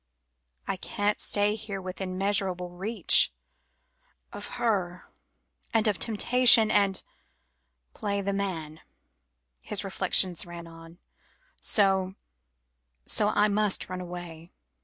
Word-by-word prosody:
"I 195 - -2
can't 205 +3 -2
stay 205 0 +2
here 210 -2 -6
within 185 0 -6
measurable 190 -2 -1
reach 200 +6 +3 1.0
of - - -6
her 185 -6 -2 0.6
and 220 -1 +3
of 205 -3 0
temptation, 230 0 +5
and 200 -2 +1 0.9
play 200 -1 -3
the 200 0 -2
man," 165 -6 -4 0.8
his - - -1
reflections 180 -3 0
ran 170 -1 -10
on, 165 0 -14 0.6
"so 190 -2 +2 0.9
so 210 -1 +1
I 210 0 +2
must 210 -2 0
run 185 0 -5
away." 175 -2 -9
195 Hz, 105 wpm, -27 LUFS, 180-210 Hz, 1.0 s, temptation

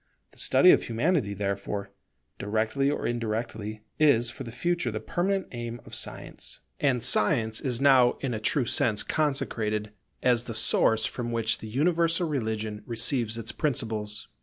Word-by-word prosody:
The - - -16
study - - +6
of - - +5
Humanity 120 - 0
therefore, 100 0 -3 0.5
directly 110 +6 0
or 145 - -2
indirectly, 110 -2 -3 0.2
is 120 -6 +4
for - - -8
the 115 - -8
future 170 +3 -1
the 110 -1 -3
permanent 190 - -1
aim 120 -1 -5
of - - -13
Science; - - -5 0.2
and 130 -5 +1
Science 110 +1 +2
is 125 -3 -1
now 130 -3 +5
in 135 -3 -2
a 110 - -2
true 120 +4 +1
sense 115 -3 +2
consecrated, 110 -8 -1 0.3
as 120 -1 +3
the 115 - -5
source 110 0 +3
from 120 -1 -4
which 115 -1 0
the 110 - -8
universal 165 - +2
religion 110 -6 -3
receives 115 -1 +1
its 115 -1 -3
principles. 110 -8 -2
115 Hz, 155 wpm, -27 LUFS, 110-140 Hz, 0.5 s, study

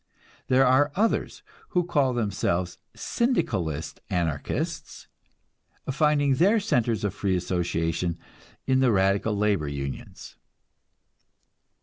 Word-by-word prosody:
There 130 +1 +4
are 135 +3 +4
others 225 +4 0 0.3
who 175 - +4
call 145 -7 +1
themselves 90 -5 -1 0.2
Syndicalist 115 - -1
anarchists, 85 -5 -3 0.8
finding 145 -1 +2
their 195 - +4
centers 120 - 0
of 100 -3 -1
free 100 -2 -1
association 85 -1 -1 0.5
in 130 0 +2
the 130 -2 +4
radical 100 +1 +1
labor 100 -7 +1
unions. 70 -1 -7
105 Hz, 95 wpm, -26 LUFS, 90-145 Hz, 0.8 s, There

